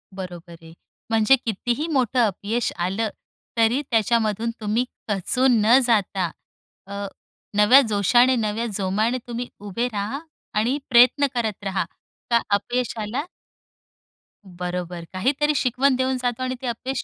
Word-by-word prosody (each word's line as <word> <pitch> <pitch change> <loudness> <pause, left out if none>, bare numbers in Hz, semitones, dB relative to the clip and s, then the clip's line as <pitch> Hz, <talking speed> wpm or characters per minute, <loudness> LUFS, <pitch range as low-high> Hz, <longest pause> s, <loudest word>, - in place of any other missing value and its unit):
बरोबर 175 -2 -8
आहे. 165 0 -14 0.4
म्हणजे 225 +4 +5
कितीही 240 - -1
मोठं 255 -3 +1
अपयश 215 +4 -2
आलं, 195 +5 -1 0.5
तरी 230 +4 +3
त्याच्यामधून 225 0 +1
तुम्ही 220 +4 0 0.2
खचून 235 +5 +2
न 240 +4 +7
जाता 195 -5 +1 0.6
अ, 200 0 -5 0.5
नव्या 210 +6 +8
जोशाने, 240 +5 +4
नव्या 220 0 -1
जोमाने 210 +5 0
तुम्ही 240 0 -4
उभे 205 +4 -2
राहा 210 +7 -3 0.4
आणि 245 +6 +1
प्रयत्न 255 +3 +6
करत 220 -4 -2
राहा, 195 -1 -1 0.5
का 235 -1 +3
अपयशाला 235 +2 -2 1.3
बरोबर, 180 -1 -5
काहीतरी 285 +10 +1
शिकवण 260 +1 +2
देऊन 260 0 0
जातो 245 0 -1
आणि 255 0 -2
ते 255 - -4
अपयश 250 +3 -3
225 Hz, 125 wpm, -23 LUFS, 200-250 Hz, 1.3 s, नव्या